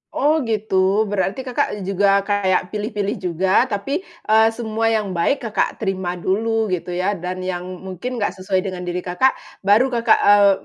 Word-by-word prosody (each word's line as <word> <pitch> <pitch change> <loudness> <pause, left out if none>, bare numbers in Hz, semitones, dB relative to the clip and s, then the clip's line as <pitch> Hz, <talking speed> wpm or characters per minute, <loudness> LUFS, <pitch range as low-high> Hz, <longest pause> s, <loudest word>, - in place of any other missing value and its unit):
Oh 305 +2 +3
gitu, 205 -2 +1
berarti 200 +5 -1
Kakak 225 -5 -2
juga 195 +1 +2
kayak 195 -3 0
pilih-pilih 210 -1 -2
juga, 185 +2 +2
tapi, 275 - -2 0.2
eee, 220 +1 +4
semua 225 -1 -1
yang 205 -3 -1
baik 185 +10 0
Kakak 220 -3 -1
terima 190 -2 -2
dulu 220 +3 0
gitu 180 0 -3
ya, 185 +3 0
dan 185 -1 -5
yang 180 -1 -3 0.2
mungkin 215 +8 -5
nggak 210 -4 -1
sesuai 185 0 0
dengan 180 -2 -5
diri 180 0 -3
Kakak, 185 +9 +2 0.3
baru 230 +6 +4
Kakak, 235 -2 +3
eee, 205 0 +6
200 Hz, 165 wpm, -20 LUFS, 185-220 Hz, 0.3 s, eee